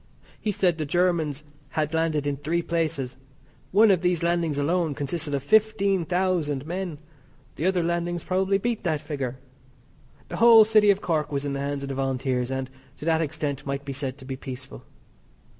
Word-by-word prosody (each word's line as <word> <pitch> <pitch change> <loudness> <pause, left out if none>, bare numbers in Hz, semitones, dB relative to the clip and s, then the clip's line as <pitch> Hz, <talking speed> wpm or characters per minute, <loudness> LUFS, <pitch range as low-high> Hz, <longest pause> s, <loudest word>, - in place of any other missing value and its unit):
He 215 - -1
said 180 -4 +1
the 155 - -1
Germans 160 -4 +1 0.3
had 155 +1 -2
landed 160 -3 0
in 145 -1 -1
three 165 +4 -1
places. 155 -7 -2 0.5
One 210 +2 +6
of 185 -3 +2
these 180 -2 +1
landings 170 -3 +1
alone 160 +1 0
consisted 145 +1 -1
of 135 - -3
fifteen 200 -1 +3
thousand 175 -6 0
men. 175 -1 -4 0.6
The 160 - -1
other 185 -2 +2
landings 170 0 -1
probably 190 +2 +1
beat 235 +2 -2
that 160 -5 0
figure. 140 -5 -4 0.9
The - - -6
whole 230 -2 +8
City 215 -1 +5
of 200 0 +3
Cork 155 -4 -1
was 140 0 -2
in 140 - -2
the 140 - -3
hands 140 0 -3
of 140 - -5
the - - -2
Volunteers, 130 -2 -1
and, 130 0 -2 0.3
to - - -8
that 165 -1 +2
extent, 145 -2 -3
might 140 0 -3
be 140 - -4
said 135 -1 -4
to 130 - -13
be 135 0 -4
peaceful. 130 -1 -8
160 Hz, 185 wpm, -25 LUFS, 140-180 Hz, 0.9 s, whole